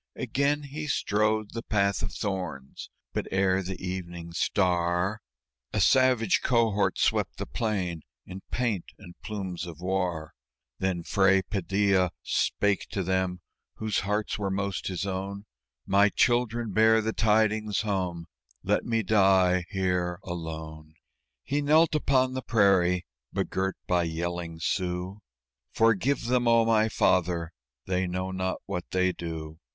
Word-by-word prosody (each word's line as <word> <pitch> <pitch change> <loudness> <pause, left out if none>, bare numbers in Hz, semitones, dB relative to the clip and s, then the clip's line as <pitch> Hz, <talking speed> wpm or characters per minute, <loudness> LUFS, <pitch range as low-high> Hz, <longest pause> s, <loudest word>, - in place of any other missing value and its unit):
Again 145 +2 0
he 150 +2 -6
strode 110 -3 0
the 115 - -4
path 100 -4 +1
of 105 - -3
thorns; 90 -10 -5 0.2
but - - -2
ere 95 0 +2
the 95 0 -6
evening 85 -2 -6
star 90 +2 +1 0.5
A 105 - 0
savage 125 0 +4
cohort 115 -5 +2
swept - - +1
the - - -4
plain 95 -7 -2 0.2
in 95 +1 -8
paint 115 -8 -1
and 90 -5 -12
plumes 95 -5 -5
of 85 -3 -9
war. 90 -4 -2 0.5
Then 95 -2 -1
Fray 95 0 +3
Padilla 95 -1 +1
spake 105 -2 0
to 95 - -2
them 95 0 -1 0.3
whose 110 -3 -1
hearts 105 +2 -2
were 100 -1 -1
most 100 0 -2
his 95 +1 -3
own: 100 +1 -4 0.4
"My 100 +1 +4
children, 120 0 +1
bear 110 +2 +5
the 110 +1 -2
tidings 110 -1 +2
home 90 -5 -2 0.4
let - - +1
me 115 -1 0
die 95 -3 +4
here 90 -2 -1
alone." 80 -2 -7 0.5
He 145 - -1
knelt 155 +3 +4
upon 130 -4 +2
the 130 - -3
prairie, 95 -6 +3 0.3
begirt 95 0 -1
by 90 -1 +1
yelling 85 0 -4
Sioux. 90 +3 -2 0.5
"Forgive 115 +4 +2
them, 120 0 +1
oh, 115 -1 +5
my 110 -1 +3
Father! 85 -4 +1 0.3
they 95 0 0
know 90 +1 -3
not 95 0 -2
what 95 -3 -4
they 95 0 +2
do!" 80 -2 -7
95 Hz, 135 wpm, -27 LUFS, 90-110 Hz, 0.5 s, bear